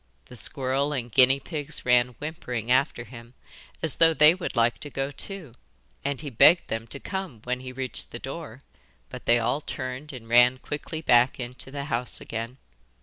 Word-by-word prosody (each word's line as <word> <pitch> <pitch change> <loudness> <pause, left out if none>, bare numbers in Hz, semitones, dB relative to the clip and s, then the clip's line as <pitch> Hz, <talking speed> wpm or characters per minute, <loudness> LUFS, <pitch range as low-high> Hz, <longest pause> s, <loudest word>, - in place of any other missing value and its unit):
The 125 - -13
squirrels 135 +3 +1
and 120 -3 -4
guinea 130 +3 +6
pigs 150 0 -2
ran 125 0 +3
whimpering 125 -7 -4
after 130 -1 +2
him, 120 +1 -13 0.5
as 160 - 0
though 165 -1 +5
they 150 +1 +7
would 180 -5 -5
like 120 0 +2
to 145 - -7
go 135 0 -3
too, 170 - -6 0.5
and 140 -1 -2
he 145 -3 -6
begged 165 +9 +5
them 115 0 -4
to 140 - -6
come 190 - -6
when 125 0 -2
he 130 0 -8
reached 130 0 -2
the - - -7
door, 135 -1 -8 0.5
but - - -9
they 120 - +6
all 120 +5 0
turned 130 +2 -5
and 125 -4 -10
ran 120 +2 +5
quickly 155 +4 -6
back 125 -1 +4
into 125 +1 -6
the 140 +1 -5
house 125 -3 -3
again. 115 +3 -6
130 Hz, 185 wpm, -26 LUFS, 120-145 Hz, 0.5 s, they